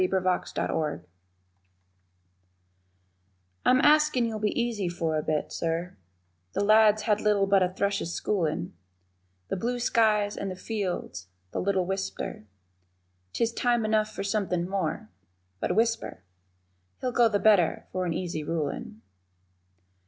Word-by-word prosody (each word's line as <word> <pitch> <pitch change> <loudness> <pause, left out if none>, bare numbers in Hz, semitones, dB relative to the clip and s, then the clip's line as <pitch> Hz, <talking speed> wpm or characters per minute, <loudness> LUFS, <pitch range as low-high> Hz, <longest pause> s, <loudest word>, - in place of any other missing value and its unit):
_ - - +4
THE - - 0
INTRODUCTION 175 -4 -1 2.6
I'm 255 - +5
askin' 300 -4 +4
you'll 220 -2 -3
be 210 +3 0
easy 225 -6 -1
for 165 -2 -2
a 155 - +1
bit, 155 0 -2
Sir, 170 +2 -2 0.6
The - - 0
lad's 215 0 +5
had 210 -1 +1
little 205 -2 +3
but 195 0 +4
a 180 - +3
thrush's 195 -2 -1
schoolin', 175 -2 -1 0.8
The - - -1
blue 245 +5 -1
skies 215 -3 +2
and 195 - -4
the 185 - -5
fields, 185 - -4 0.2
the - - -2
little 190 -1 +1
whipster, 190 - -4 0.9
'Tis 230 0 0
time 240 -2 +1
enough 215 0 +2
for 205 - -5
something 195 -4 -1
more 175 - -3 0.5
(But 180 - -1
whisper) 225 - 0 0.8
He'll 255 - -2
go 240 -2 +4
the 205 - +1
better 200 -4 +3
for 185 0 -2
an 165 - -1
easy 170 -4 -3
rulin'. 170 +9 -4
200 Hz, 135 wpm, -27 LUFS, 175-220 Hz, 2.6 s, I'm